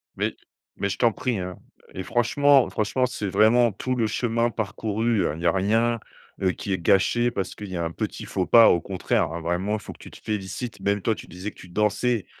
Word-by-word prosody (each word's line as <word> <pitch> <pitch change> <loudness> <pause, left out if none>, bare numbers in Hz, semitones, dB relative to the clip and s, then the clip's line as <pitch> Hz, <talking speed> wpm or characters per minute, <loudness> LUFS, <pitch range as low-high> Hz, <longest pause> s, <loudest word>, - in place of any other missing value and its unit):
Mais - - -1 0.4
mais 100 - -1
je - - -3
t'en 120 -2 +3
prie, 120 0 -2
hein 90 0 -5 0.4
et 95 - -5
franchement, 135 +5 +3
franchement 110 +5 0
c'est 110 -4 -4
vraiment 110 +4 +4
tout 130 +6 -3
le 115 - +1
chemin 115 +1 0
parcouru. 110 +1 -1
Heu, - - 0
il 80 - -8
y 85 - -4
a 85 - +5
rien, 115 +5 +1 0.4
heu, 95 -1 +3
qui 100 - -6
est 95 - +1
gâché 120 +7 +3
parce 95 -4 -4
qu'il 105 - -8
y 95 - -4
a 85 - -1
un 80 - -2
petit - - -5
faux 95 -2 -2
pas, 115 -1 +7
au 85 - +4
contraire, 95 -4 -1
hein. 85 - -5
Vraiment 90 +5 -1
il 110 - -1
faut - - -9
que - - -20
tu - - -12
te - - -13
félicites, 105 +3 -4
même 100 0 0
toi 110 +2 +1
tu - - -11
disais 90 +5 -6
que - - -21
tu 90 - -12
dansais 105 +3 0
105 Hz, 235 wpm, -24 LUFS, 95-120 Hz, 0.4 s, pas